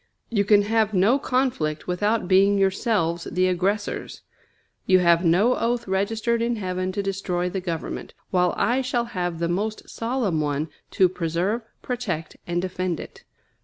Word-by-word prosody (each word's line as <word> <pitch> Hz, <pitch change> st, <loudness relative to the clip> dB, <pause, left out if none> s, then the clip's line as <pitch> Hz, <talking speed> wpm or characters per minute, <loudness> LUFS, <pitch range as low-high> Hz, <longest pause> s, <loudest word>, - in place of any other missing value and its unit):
You 205 Hz, -3 st, +2 dB
can 205 Hz, 0 st, +5 dB
have 215 Hz, 0 st, +1 dB
no 210 Hz, +9 st, +4 dB
conflict 250 Hz, -, -1 dB
without 205 Hz, +3 st, 0 dB
being 195 Hz, +2 st, +5 dB
yourselves 190 Hz, -3 st, +1 dB
the 185 Hz, +2 st, +2 dB
aggressors. 195 Hz, +3 st, -2 dB, 0.6 s
You 185 Hz, -, +6 dB
have 170 Hz, -1 st, +4 dB
no 190 Hz, +9 st, +4 dB
oath 235 Hz, 0 st, -1 dB
registered 220 Hz, +4 st, 0 dB
in 235 Hz, +1 st, 0 dB
heaven 185 Hz, -2 st, -2 dB
to 200 Hz, 0 st, -2 dB
destroy 185 Hz, -2 st, -2 dB
the 190 Hz, 0 st, -3 dB
Government, 170 Hz, -3 st, -5 dB, 0.2 s
while 180 Hz, -1 st, +2 dB
I 250 Hz, +3 st, +2 dB
shall 245 Hz, -2 st, -1 dB
have 180 Hz, -7 st, -3 dB
the 170 Hz, +1 st, -1 dB
most 210 Hz, +5 st, -2 dB
solemn 230 Hz, -9 st, -1 dB
one 145 Hz, +1 st, -1 dB, 0.3 s
to 190 Hz, -, +6 dB
"preserve, 180 Hz, +5 st, -1 dB, 0.2 s
protect, 200 Hz, -11 st, -3 dB
and 175 Hz, 0 st, 0 dB
defend" 185 Hz, -2 st, -2 dB
it. -, -, -11 dB
190 Hz, 155 wpm, -24 LUFS, 175-225 Hz, 0.6 s, You